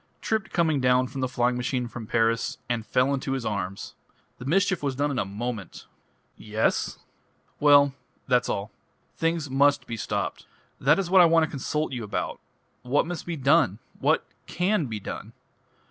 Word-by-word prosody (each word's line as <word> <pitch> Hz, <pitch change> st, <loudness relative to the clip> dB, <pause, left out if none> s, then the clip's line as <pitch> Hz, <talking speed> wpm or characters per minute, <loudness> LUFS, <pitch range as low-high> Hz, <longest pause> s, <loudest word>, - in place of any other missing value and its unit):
"Tripped 220 Hz, -3 st, -1 dB
coming 160 Hz, -4 st, +2 dB
down 125 Hz, 0 st, +4 dB
from 130 Hz, +1 st, -6 dB
the 130 Hz, -, +1 dB
flying 125 Hz, 0 st, +1 dB
machine 125 Hz, 0 st, -1 dB
from 115 Hz, -1 st, -8 dB
Paris 115 Hz, 0 st, +1 dB
and 120 Hz, -2 st, -1 dB
fell 130 Hz, +2 st, +2 dB
into 135 Hz, 0 st, -2 dB
his 130 Hz, -3 st, -3 dB
arms. 100 Hz, -2 st, -4 dB, 0.5 s
The 125 Hz, -, -8 dB
mischief 190 Hz, +4 st, +2 dB
was 140 Hz, -2 st, -1 dB
done 145 Hz, +2 st, 0 dB
in 130 Hz, -, -1 dB
a -, -, 0 dB
moment!" 105 Hz, 0 st, -5 dB, 0.5 s
"Yes?" 110 Hz, +1 st, -1 dB, 0.6 s
"Well 145 Hz, -1 st, +6 dB, 0.3 s
that's 125 Hz, -2 st, +2 dB
all. 100 Hz, +1 st, -3 dB, 0.4 s
Things 165 Hz, -2 st, 0 dB
must 140 Hz, +1 st, +3 dB
be 115 Hz, -, -5 dB
stopped. -, -, -3 dB, 0.3 s
That 150 Hz, +4 st, +4 dB
is 185 Hz, -3 st, -2 dB
what 190 Hz, -1 st, +8 dB
I -, -, +8 dB
want 165 Hz, 0 st, +5 dB
to -, -, -10 dB
consult 150 Hz, +3 st, -2 dB
you 120 Hz, -2 st, -4 dB
about. 105 Hz, -, -3 dB, 0.4 s
What 130 Hz, +4 st, +1 dB
must 175 Hz, 0 st, -6 dB
be 170 Hz, -2 st, -3 dB
done? 135 Hz, -, +3 dB, 0.2 s
What -, -, +2 dB, 0.2 s
can 180 Hz, -3 st, 0 dB
be 110 Hz, -2 st, -4 dB
done? -, -, -7 dB
135 Hz, 175 wpm, -26 LUFS, 120-155 Hz, 0.6 s, what